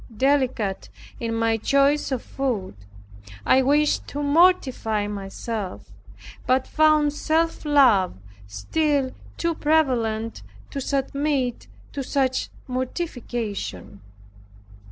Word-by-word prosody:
Delicate 260 -7 +1 0.3
in 230 -1 -2
my 225 0 +1
choice 280 +5 +2
of 255 -3 -2
food, 240 - -3 0.7
I 265 - +5
wished 295 +3 +2
to 290 +1 -4
mortify 285 - +3
myself, 200 - -5 0.6
but 255 +1 +3
found 305 -2 +3
self 320 +2 0
love 255 -11 +4 0.3
still 275 - 0 0.3
too 335 0 0
prevalent, 245 -9 0 0.3
to 275 - -4
submit 275 -1 -1 0.2
to 280 - -4
such 260 -1 0 0.2
mortification. 245 - -4
260 Hz, 95 wpm, -24 LUFS, 225-290 Hz, 0.7 s, I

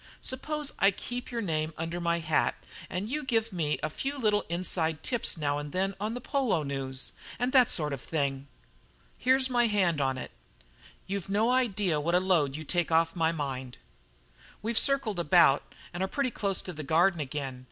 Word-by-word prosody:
Suppose 295 +3 -2
I 195 - +6
keep 245 +5 -5
your 235 -2 -3
name 155 -3 -1
under 165 +2 -3
my 170 0 +1
hat 160 -2 +1 0.3
and 185 +3 -3
you 300 +5 -2
give 225 -5 0
me 155 -4 0
a 155 - 0
few 275 - -3
little 210 -5 +2
inside 165 -2 0
tips 240 -7 +1
now 145 -2 0
and 145 0 -6
then 195 +1 0
on 220 +4 -2
polo 255 - 0
news, 135 -2 -4 0.3
and 245 +1 0
that 255 -3 +6
sort 150 -3 0
of 135 - -5
thing?" 140 -3 -2 0.7
"Here's 260 +1 +3
my 240 -2 +3
hand 185 -8 +2
on 135 -1 0
it. - - -6 0.7
You've 195 -1 -4
no 215 +4 +2
idea 205 -11 +1
what 170 +4 +1
a - - +6
load 170 -7 +2
you 155 - -5
take 175 +2 0
off 165 +1 +3
my 165 -1 +2
mind." 130 -5 -4 0.9
"We've 230 +2 -1
circled 270 -8 +2
about 165 -4 +4 0.2
and 175 - -4
are 190 - +1
pretty 275 +1 -1
close 200 -5 -1
to 180 - -5
the 155 - -6
Garden 170 +5 +3
again. 135 -2 -4
175 Hz, 185 wpm, -29 LUFS, 155-225 Hz, 0.9 s, I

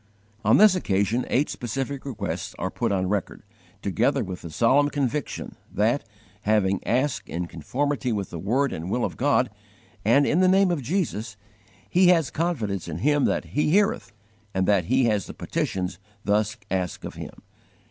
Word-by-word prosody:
On 110 +2 +5
this 210 -2 +7
occasion 110 - 0
eight 140 +4 +2
specific 135 +4 -4
requests 110 -7 -4
are - - -3
put - - -1
on 95 -2 0
record, 100 -1 -2 0.4
together - - +1
with 90 -1 -6
the 85 - -7
solemn 130 - +3
conviction 145 0 -2 0.2
that, 110 +7 +1 0.4
having 100 -3 +2
asked 130 +3 0
in 85 +2 -3
conformity 125 - -2
with 100 -3 -3
the 85 - -5
word 130 - +1
and 85 +3 -5
will 120 +4 0
of - - -4
God, 130 -3 +2 0.5
and 130 +7 +4
in 160 - +2
the 185 - +5
name 190 0 +4
of 165 -5 -1
Jesus, 120 - -2 0.5
he 180 +1 +4
has 165 -5 +4
confidence 115 - -2
in 80 -2 -4
Him 145 +8 +2
that - - 0
He 150 +1 +1
heareth 200 +5 +2 0.4
and 95 0 +1
that 100 -4 +3
he 130 +5 +3
has 105 -4 +1
the - - -9
petitions 90 0 -3 0.2
thus 105 +1 +1
asked 90 -2 -2
of - - -6
Him. - - -9
120 Hz, 170 wpm, -25 LUFS, 100-145 Hz, 0.5 s, this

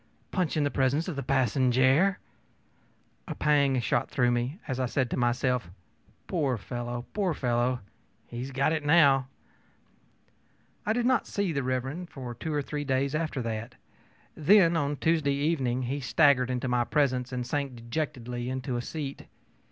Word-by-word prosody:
Punch 180 -5 0
in 150 - +2
the 145 - 0
presence 140 +5 +1
of 180 - -3
the 140 - -3
passenjare!ö 130 - +3 1.1
A - - -4
pang 140 -3 +3
shot 120 - 0
through 125 -2 +2
me 120 +6 -1
as 130 -3 -3
I 130 - +1
said 125 0 -1
to - - 0
myself, 125 -3 0 0.6
ōPoor 140 -9 0
fellow, 120 +2 -5
poor 190 -6 0
fellow! 125 0 0 0.4
he 120 - -8
has 130 +2 -4
got 140 +4 +1
it, 155 -2 -1
now.ö 140 -4 +5 1.6
I 215 - +3
did 240 +1 0
not 255 -1 +2
see 200 -4 -1
Mr. 135 +5 -2
for 125 -3 -7
two 155 +7 -5
or 145 -1 0
three 145 +1 -4
days 135 0 0
after 155 -4 -2
that. 115 +2 -4 0.6
Then, 170 +2 +5
on 145 -2 0
Tuesday 155 -3 +1
evening, 135 -4 0
he 135 +4 -2
staggered 140 -2 +3
into 125 0 -2
my 125 -1 +2
presence 130 -2 0
and 125 -1 -3
sank 140 0 -2
dejectedly 120 0 -4
into 130 -1 -3
a - - -2
seat. 140 +1 -6
135 Hz, 160 wpm, -28 LUFS, 125-150 Hz, 1.6 s, now.ö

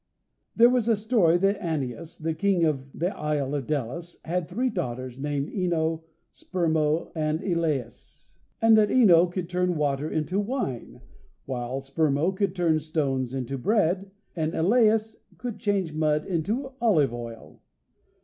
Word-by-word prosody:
There 235 - +7
was 245 -3 +1
a 230 - +4
story 205 -6 +3
that 195 +3 +1
Anius, 160 - -4
the 160 0 -2
King 195 0 +1
of 135 -3 -2
the 175 +7 -2
Isle 150 -2 -1
of 140 -4 -3
Delos, 155 +4 -3
had 170 0 -1
three 245 +7 -1
daughters, 130 - -4
named 145 0 -2
OEno, 165 -4 0 0.3
Spermo, 160 -3 0
and 155 -1 -1
Elais, 155 - -3 0.3
and 225 0 +6
that 210 - +3
OEno 180 -8 +5
could 180 -1 -3
turn 180 0 0
water 145 0 0
into 160 +5 -1
wine, 205 - -3 0.4
while 130 0 -3
Spermo 145 +5 0
could 200 +1 -1
turn 165 -3 +2
stones 135 -5 -2
into 135 +1 -3
bread, 195 - +1 0.3
and 160 -1 -1
Elais 220 +4 +3 0.2
could 245 -3 -5
change 195 -7 0
mud 155 -1 +1
into 210 - -2
olive 155 - +3
oil. 115 -1 -9
165 Hz, 145 wpm, -26 LUFS, 145-195 Hz, 0.4 s, There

